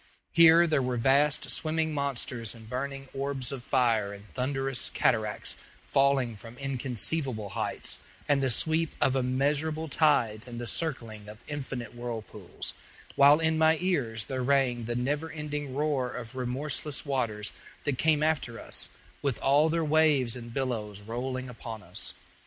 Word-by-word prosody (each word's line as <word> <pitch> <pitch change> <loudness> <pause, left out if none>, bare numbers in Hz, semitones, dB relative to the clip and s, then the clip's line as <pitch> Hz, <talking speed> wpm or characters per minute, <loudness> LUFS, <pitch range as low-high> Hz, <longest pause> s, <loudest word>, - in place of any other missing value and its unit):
Here 170 0 +7
there 155 -4 +2
were 125 -1 -1
vast 140 +5 +3
swimming 160 0 -1
monsters 125 -5 -2
and 110 -1 -12
burning 135 +3 -4
orbs 135 -2 -2
of 135 -3 -6
fire 115 -7 +2
and 100 +1 -12
thunderous 135 0 -1
cataracts 110 -2 +1 0.3
falling 135 -4 +2
from 115 +3 -11
inconceivable 130 - -1
heights, 90 - -1 0.3
and 145 -1 +3
the 135 - +2
sweep 160 +6 +2
of 135 - +3
immeasurable 145 +5 0
tides 125 -8 +3
and 120 -1 -6
the 120 - -4
circling 115 -7 -3
of 105 - -9
infinite 135 -5 -5
whirlpools; 115 -5 -6 0.4
while 145 +2 +7
in 160 -1 +2
my 160 0 +5
ears 135 -12 0
there 130 +2 -3
rang 125 -3 +2
the 120 +1 -2
never 145 +6 -1
ending 150 -3 -4
roar 145 -4 0
of 125 0 -7
remorseless 135 +4 -1
waters 115 -7 -1 0.3
that 145 -4 -1
came 155 -2 +3
after 150 -7 0
us, - - -2 0.3
with 140 -5 0
all 145 +4 +4
their 165 0 +1
waves 150 -6 +3
and 120 -1 -8
billows 110 -6 -3
rolling 130 +4 -4
upon 115 -3 -8
us. - - -3
135 Hz, 150 wpm, -29 LUFS, 120-150 Hz, 0.4 s, Here